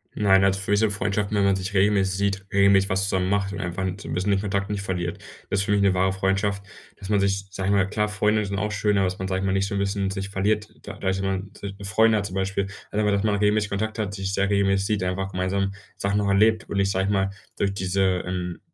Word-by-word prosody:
Nein, 95 Hz, -2 st, +4 dB
also 95 Hz, 0 st, +2 dB
für 95 Hz, -, -3 dB
mich 105 Hz, -, +4 dB
sind 110 Hz, -1 st, +2 dB
Freundschaften, 100 Hz, +1 st, -1 dB
wenn 100 Hz, -, +3 dB
man 100 Hz, -1 st, +3 dB
sich 95 Hz, +2 st, -4 dB
regelmäßig 95 Hz, -1 st, +3 dB
sieht, 100 Hz, -1 st, -1 dB
regelmäßig 100 Hz, -1 st, +4 dB
was 95 Hz, 0 st, +1 dB
zusammen 95 Hz, -1 st, 0 dB
macht 100 Hz, -1 st, 0 dB
und 100 Hz, -, -5 dB
einfach 90 Hz, 0 st, -3 dB
'n 95 Hz, 0 st, -2 dB
so -, -, -9 dB
'n -, -, -4 dB
bisschen 95 Hz, +3 st, 0 dB
den 100 Hz, -, +2 dB
Kontakt 100 Hz, -1 st, -2 dB
nicht 105 Hz, -1 st, -2 dB
verliert. 90 Hz, -3 st, -3 dB, 0.3 s
Das 100 Hz, -, +1 dB
ist 95 Hz, -, 0 dB
für 105 Hz, -, -1 dB
mich 100 Hz, -1 st, +3 dB
'ne 100 Hz, -1 st, +4 dB
wahre 95 Hz, +1 st, +2 dB
Freundschaft, 95 Hz, +1 st, 0 dB, 0.3 s
dass 95 Hz, -, -9 dB
man 105 Hz, -1 st, +3 dB
sich, 100 Hz, 0 st, 0 dB
sage 95 Hz, 0 st, -2 dB
ich 100 Hz, -, +3 dB
mal 95 Hz, -1 st, +3 dB
klar, 105 Hz, 0 st, 0 dB
Freunde 105 Hz, 0 st, +1 dB
sind 100 Hz, 0 st, -3 dB
auch 105 Hz, +2 st, -1 dB
schön, 105 Hz, 0 st, +1 dB
aber 95 Hz, -, +3 dB
dass 90 Hz, 0 st, -4 dB
man, 95 Hz, -, -3 dB
sage 95 Hz, 0 st, -1 dB
ich -, -, -2 dB
mal, 95 Hz, -, +1 dB
nicht 95 Hz, 0 st, +1 dB
so 100 Hz, -, -4 dB
'n -, -, 0 dB
bisschen 100 Hz, 0 st, -1 dB
sich 95 Hz, 0 st, -4 dB
verliert, 105 Hz, +2 st, 0 dB
da -, -, -7 dB
dadurch 95 Hz, 0 st, -1 dB
jemand 95 Hz, 0 st, -4 dB
'ne 100 Hz, -1 st, -5 dB
Freundin 110 Hz, +2 st, +4 dB
hat 100 Hz, -, -2 dB
zum 95 Hz, -2 st, -6 dB
Beispiel. 95 Hz, 0 st, -1 dB, 0.2 s
Also, 105 Hz, -, -1 dB
aber, 105 Hz, -, +2 dB
dass 100 Hz, +1 st, +1 dB
man 105 Hz, -1 st, +2 dB
regelmäßig 105 Hz, 0 st, +2 dB
Kontakt 110 Hz, +2 st, -3 dB
hat, 100 Hz, -2 st, -2 dB
sich 95 Hz, 0 st, -3 dB
sehr 100 Hz, 0 st, +1 dB
regelmäßig 100 Hz, -1 st, +2 dB
sieht, 105 Hz, -3 st, 0 dB
einfach 95 Hz, +2 st, -2 dB
gemeinsam 95 Hz, +2 st, -1 dB, 0.2 s
Sachen 100 Hz, +1 st, 0 dB
auch 100 Hz, -, 0 dB
erlebt. 110 Hz, +3 st, +3 dB
Und 100 Hz, -, -2 dB
nicht 100 Hz, 0 st, +2 dB
sage 95 Hz, 0 st, 0 dB
ich 100 Hz, -, 0 dB
mal, 95 Hz, -1 st, +1 dB, 0.3 s
durch 100 Hz, -1 st, 0 dB
diese, 95 Hz, -1 st, 0 dB
ähm, 90 Hz, -1 st, -4 dB
100 Hz, 280 wpm, -24 LUFS, 95-100 Hz, 0.3 s, Nein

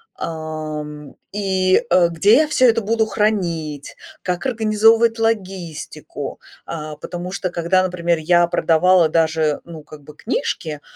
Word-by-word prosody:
ам, 155 Hz, -2 st, -6 dB, 0.2 s
и, 190 Hz, +1 st, +1 dB
э, 175 Hz, -2 st, +5 dB
где 200 Hz, +7 st, +4 dB
я 310 Hz, -, +3 dB
всё 260 Hz, -4 st, +3 dB
это 230 Hz, 0 st, +1 dB
буду 220 Hz, +2 st, +1 dB
хранить, 170 Hz, -10 st, -2 dB, 0.3 s
как 180 Hz, +6 st, -3 dB
организовывать 225 Hz, 0 st, +3 dB
логистику. 190 Hz, -7 st, -4 dB, 0.3 s
А, 155 Hz, -2 st, -6 dB
потому 175 Hz, +3 st, -6 dB
что 190 Hz, -1 st, -3 dB
когда, 175 Hz, +2 st, +1 dB
например, 175 Hz, -2 st, -1 dB
я 175 Hz, +2 st, +3 dB
продавала 170 Hz, 0 st, +3 dB
даже, 160 Hz, -2 st, +1 dB
ну, 165 Hz, -2 st, -10 dB
как 150 Hz, -1 st, -14 dB
бы, 150 Hz, +1 st, -14 dB
книжки, 160 Hz, -, -3 dB
175 Hz, 130 wpm, -20 LUFS, 155-210 Hz, 0.3 s, э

